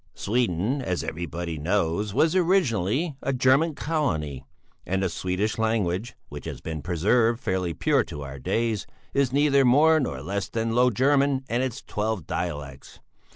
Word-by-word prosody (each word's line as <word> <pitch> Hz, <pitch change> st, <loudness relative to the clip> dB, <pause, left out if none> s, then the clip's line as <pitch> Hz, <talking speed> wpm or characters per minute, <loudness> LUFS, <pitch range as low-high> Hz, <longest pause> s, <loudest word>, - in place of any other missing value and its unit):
"Sweden, 115 Hz, -, 0 dB
as 90 Hz, -8 st, -2 dB
everybody 85 Hz, 0 st, -4 dB
knows, 95 Hz, +4 st, 0 dB
was 160 Hz, -, +2 dB
originally 155 Hz, -, +1 dB
a 135 Hz, -, -1 dB
German 135 Hz, +5 st, +3 dB
colony, 80 Hz, -, -2 dB, 0.4 s
and 95 Hz, +1 st, -1 dB
the 95 Hz, -, +1 dB
Swedish 95 Hz, +6 st, -2 dB
language, 110 Hz, -1 st, 0 dB
which -, -, -9 dB
has -, -, -6 dB
been 80 Hz, -2 st, -5 dB
preserved 110 Hz, -, +2 dB
fairly 95 Hz, -6 st, -2 dB
pure -, -, +2 dB
to 75 Hz, -, -7 dB
our 70 Hz, 0 st, -8 dB
days, 110 Hz, -, -1 dB, 0.3 s
is 140 Hz, -3 st, +2 dB
neither 140 Hz, 0 st, +4 dB
more 150 Hz, +6 st, +5 dB
nor 70 Hz, -, -3 dB
less 100 Hz, +4 st, -3 dB
than 115 Hz, 0 st, -1 dB
Low 125 Hz, +1 st, +4 dB
German 135 Hz, +2 st, +2 dB
and 120 Hz, +2 st, +1 dB
its 130 Hz, 0 st, -3 dB
twelve 105 Hz, -5 st, -2 dB
dialects. 75 Hz, -6 st, -5 dB
110 Hz, 155 wpm, -25 LUFS, 85-130 Hz, 0.4 s, more